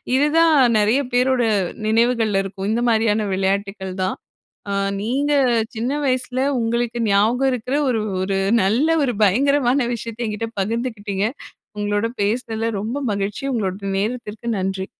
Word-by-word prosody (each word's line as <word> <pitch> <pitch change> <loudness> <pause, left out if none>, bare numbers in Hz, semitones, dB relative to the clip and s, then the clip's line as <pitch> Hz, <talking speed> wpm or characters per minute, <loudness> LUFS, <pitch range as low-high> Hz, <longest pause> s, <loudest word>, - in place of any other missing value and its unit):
இதுதான் 310 +4 +4 0.2
நெறைய 215 +6 +3
பேரோட 250 +1 +2 0.5
நினைவுகள்ல 225 -3 +2
இருக்கும். 195 0 -5
இந்த 235 +2 0
மாரியான 220 -1 +2
விளையாட்டுக்கள் 195 0 -2
தான். 185 - -1 0.6
ஆ - - -1 0.3
நீங்க, 270 +7 0 0.4
சின்ன 235 +4 -2
வயசில 255 -1 -1 0.2
உங்களுக்கு 235 +1 -1
ஞாபகம் 230 +7 +3
இருக்கிற 250 +2 -2
ஒரு 225 -3 0 0.2
ஒரு 195 0 -1 0.3
நல்ல 230 +11 +2 0.2
ஒரு 250 -3 0
பயங்கரமான 260 +4 +3
விஷயத்தை 230 +1 -6
என்கிட்ட 215 +2 -3
பகிர்ந்துக்கிட்டீங்க. 210 -2 -2 0.5
உங்களோட 205 +1 0 0.2
பேசுனதில 225 +1 -1
ரொம்ப 230 +7 -3
மகிழ்ச்சி. 200 +3 -3
உங்களோட 195 -5 -1 0.2
நேரத்திற்கு 225 0 -4
நன்றி. 190 0 -2
225 Hz, 125 wpm, -21 LUFS, 205-250 Hz, 0.6 s, இதுதான்